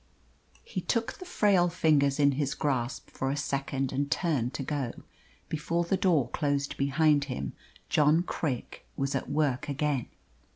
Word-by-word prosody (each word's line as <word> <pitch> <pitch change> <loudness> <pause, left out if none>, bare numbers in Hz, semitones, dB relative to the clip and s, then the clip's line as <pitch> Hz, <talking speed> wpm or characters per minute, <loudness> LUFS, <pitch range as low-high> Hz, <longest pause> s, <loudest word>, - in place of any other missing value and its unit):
He 475 - -4
took 230 -2 0
the 365 - -8
frail 200 - +3
fingers 150 -5 +3
in 140 -1 +5
his 140 0 -1
grasp 135 -4 -2
for 135 - -2
a 140 - -1
second 135 -2 -1
and 140 +1 -1
turned 145 -8 0
to 140 - -3
go. 135 -4 -2 0.5
Before 165 +2 -1
the 170 +3 +1
door 165 -10 +3
closed 140 -1 -1
behind 145 +1 +3
him 95 - -4 0.3
John 155 +3 +4
Craik 145 -8 -3
was 135 0 -1
at 135 - -2
work 145 -3 0
again. 140 -2 0
145 Hz, 155 wpm, -29 LUFS, 135-160 Hz, 0.5 s, in